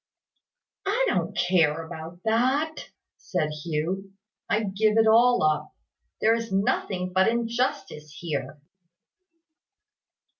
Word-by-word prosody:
"I 475 +6 +2
don't - - -1
care 165 -3 +2
about 165 +1 -9
that," 260 +8 0 0.3
said 155 -5 -2
Hugh. 170 +5 -3 0.4
"I 220 0 +1
give 210 +2 +1
it 225 - +5
all 235 +1 +5
up. 155 -1 0 0.5
There 225 - +4
is 230 -2 -3
nothing 190 -1 -1
but 190 +1 +4
injustice 235 - -2
here." 150 -3 -4
195 Hz, 105 wpm, -26 LUFS, 165-230 Hz, 0.5 s, it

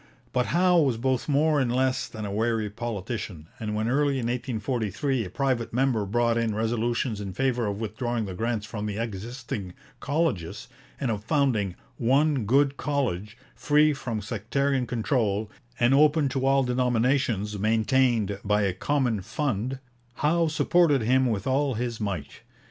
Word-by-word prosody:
But 125 -1 +1
Howe 180 +1 +4
was 135 -7 +2
both 130 +3 -1
more 150 +1 +3
and 125 -3 +1
less 130 +1 +1
than 110 -2 -7
a 100 - -4
wary 110 0 0
politician, 105 -6 -5
and 105 -1 -3
when 110 +1 -1
early 140 +3 +2
in 125 - -2
1843 120 0 -1
a - - -7
private 130 +1 -1
member 125 -6 +1
brought 115 +2 +1
in 115 -2 0
resolutions 115 0 -1
in 100 -2 -5
favour 125 -2 0
of 100 0 -3
withdrawing 115 +1 -2
the 95 - -5
grants 110 +2 -2
from 105 -1 -5
the 105 -1 -4
existing 110 -3 -5 0.2
colleges, 140 - -1 0.3
and 130 -4 0
of 105 -1 -3
founding 115 - +1 0.2
'one 135 +1 +2
good 140 +4 +3
college, 115 -7 -2 0.2
free 150 +1 +3
from 115 -6 -4
sectarian 125 +5 -1
control, 110 -3 0 0.3
and 120 +2 +4
open 150 0 +4
to 135 +1 -1
all 135 0 +4
denominations, 125 -4 +1
maintained 110 -1 +2
by 105 0 +2
a 95 -2 +1
common 125 0 0
fund,' 130 +2 -2 0.4
Howe 165 +5 +2
supported 155 -3 +3
him 130 +3 +3
with 110 -2 -1
all 135 0 +1
his 115 0 -3
might. 95 -9 -4
120 Hz, 155 wpm, -26 LUFS, 105-135 Hz, 0.4 s, Howe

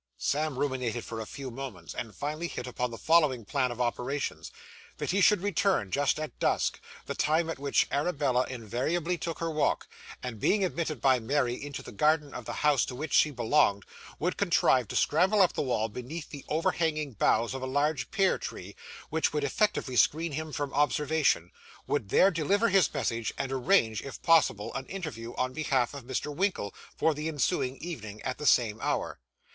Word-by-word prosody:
Sam 150 -1 -1
ruminated 125 -4 -2
for 115 - -6
a 110 - -6
few 135 -2 -7
moments, 115 -10 -7
and 110 -4 -6
finally 155 - -3
hit 125 - -6
upon 125 0 -2
the 115 - -7
following 150 -8 +3
plan 130 +2 0
of 120 0 -7
operations; 125 +3 -2 0.5
that - - -2
he 200 +2 +2
should 195 0 +5
return 195 - +1
just 145 +1 +1
at 155 -1 -6
dusk - - +1 0.3
the - - -3
time 160 +2 +1
at 160 - -6
which 140 0 +2
Arabella 140 -4 +1
invariably 130 - -1
took 165 +1 -3
her 165 -1 -2
walk 155 -2 0 0.4
and, 125 -4 -5
being 200 - +2
admitted 160 -7 -3
by 130 -2 +4
Mary 125 +1 0
into 140 +3 -6
the - - -9
garden 150 +6 +2
of - - -7
the - - -4
house 145 -4 +4
to 125 - -6
which 155 +5 -5
she 155 - +5
belonged, 120 -6 +2 0.3
would 180 +3 -1
contrive 135 - +3
to - - -6
scramble 185 +7 +3
up 185 -3 +5
the - - -1
wall, 120 -5 0
beneath 125 +8 -7
the 140 -2 -8
overhanging 155 -2 0
boughs 115 +3 +2
of 135 - -5
a 130 - -3
large 145 +3 0
pear 195 -2 +2
tree, - - -7 0.4
which 160 +1 +1
would 150 -1 -1
effectually 140 -3 0
screen 160 +6 +3
him 155 +2 -4
from 145 -1 -3
observation; 150 - +2 0.3
would 120 -9 -1
there 195 - +5
deliver 195 +8 +2
his 195 -2 +4
message, 115 -5 -1
and 135 - -3
arrange, 130 - +2
if 135 - -8
possible, 160 - +3
an 135 -1 -5
interview 130 -12 -6
on 130 0 -1
behalf 135 -4 0
of 140 -4 -8
Mr. 135 +3 -3
Winkle 185 - -1 0.2
for 160 - +2
the 150 +2 -4
ensuing 135 -3 0
evening 110 -11 -7
at 130 - -3
the 150 - -2
same 110 -3 +3
hour. - - -2
145 Hz, 190 wpm, -29 LUFS, 125-160 Hz, 0.5 s, should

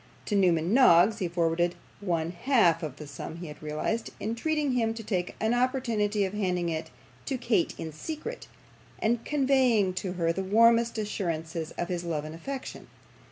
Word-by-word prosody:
To 210 - -1
Newman 175 -2 +3
Noggs 215 -4 +6
he 185 - 0
forwarded 170 0 +1 0.2
one 170 -4 -1
half 185 -2 +3
of 150 -5 -5
the 150 - -9
sum 145 +2 -7
he 170 +1 -7
had 150 -2 -10
realised, 155 +9 -2
entreating 285 +7 -1
him 225 -3 +1
to 225 - -7
take 180 -4 -2
an 220 +2 +1
opportunity 235 -5 +1
of 190 - -4
handing 180 -4 0
it 160 0 -3 0.4
to 265 - -1
Kate 235 -8 +1
in 160 - -5
secret, 320 - -6 0.5
and 230 +1 0
conveying 260 -9 +2
to 185 -2 -3
her 165 -2 0
the 190 - -3
warmest 230 +4 +4
assurances 165 -6 -3
of 175 - -2
his 175 -1 -2
love 155 -3 -2
and 155 - -7
affection. 265 +11 -7
195 Hz, 170 wpm, -28 LUFS, 170-230 Hz, 0.5 s, Noggs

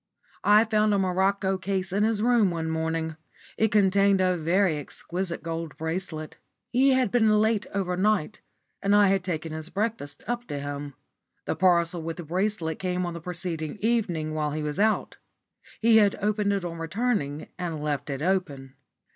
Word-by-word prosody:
I 210 +2 +6
found 215 -2 +2
a - - +2
morocco 190 +1 +1
case 190 -1 -2
in 200 - +1
his 220 -1 +1
room 235 -4 +4
one 165 -2 -3
morning. 160 0 -2 0.4
It 220 -1 +1
contained 200 -1 +4
a 185 -1 +2
very 170 0 +1
exquisite 170 +4 -4
gold 165 -1 -5
bracelet. 160 -1 -4 0.3
He 265 +2 +4
had 255 -5 +2
been 225 -3 +4
late 215 0 +2
overnight, 195 0 0 0.4
and 200 +1 +3
I 205 -1 +6
had 195 -1 +1
taken 165 -3 -3
his 160 +1 -4
breakfast 200 -9 -3
up 240 0 -3
to 145 - -4
him. 145 0 -6 0.5
The - - -1
parcel 175 -2 +2
with 165 +1 -5
the 175 - -6
bracelet 175 -1 -1
came 180 -1 -1
on 175 - -4
the 170 - -7
preceding 170 -2 -3
evening 190 -9 0
while 150 -1 -1
he 155 0 -3
was 150 +4 -3
out. 215 +1 +1 0.6
He 225 0 +5
had 205 -2 +4
opened 210 0 +1
it 195 -3 -2
on 170 -1 -5
returning 165 - -2
and 170 -3 -3
left 145 -1 -3
it 140 +1 -3
open. 155 -8 -1
185 Hz, 170 wpm, -26 LUFS, 160-205 Hz, 0.6 s, I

